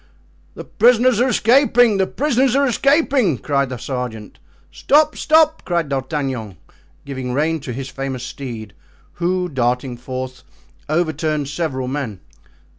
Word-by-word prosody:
"The - - -7
prisoners 245 0 +3
are 255 - +3
escaping! 245 -2 +4
the 190 -1 +1
prisoners 265 -1 +1
are 280 0 +3
escaping!" 275 - +2
cried 140 +1 -1
the 130 - -5
sergeant. 120 -4 -6 0.3
"Stop! 305 +1 +3
stop!" 315 0 +3
cried 170 -4 -1
D'Artagnan, 130 - -3 0.5
giving 130 -3 -5
rein 160 +4 0
to 135 -3 -7
his 135 +2 -5
famous 130 -1 -5
steed, 115 -6 -7 0.5
who, 180 +1 0
darting 125 -3 -1
forth, 130 +1 -6 0.5
overturned 155 -2 -1
several 140 -4 -3
men. 130 -8 -4
145 Hz, 125 wpm, -19 LUFS, -, 0.5 s, escaping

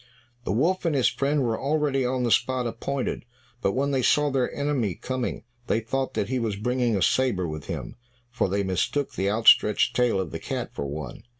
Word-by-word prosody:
The - - -1
wolf 165 - +1
and 165 -3 +1
his 130 - +4
friend 140 +1 0
were 115 -2 -1
already 140 -1 +1
on 125 0 0
the 120 - 0
spot 125 +1 +2
appointed, 135 +3 -3 0.4
but 100 - +1
when 140 +2 0
they 135 -2 +1
saw 145 +4 +3
their 130 -2 0
enemy 135 - -1
coming 130 -1 -4 0.2
they 110 - +2
thought 130 +4 -3
that 100 - 0
he 130 +2 -1
was 110 -4 -1
bringing 120 +1 0
a 95 - +1
sabre 105 -6 +1
with 75 -1 -6
him, - - -6 0.3
for 125 -5 0
they 100 +2 0
mistook 95 +10 -1
the 95 +1 0
outstretched 105 -1 +4
tail 120 -5 +2
of 95 -4 -3
the - - -5
cat - - -4
for 70 - -4
one. 70 -2 -6
125 Hz, 205 wpm, -25 LUFS, 100-135 Hz, 0.4 s, his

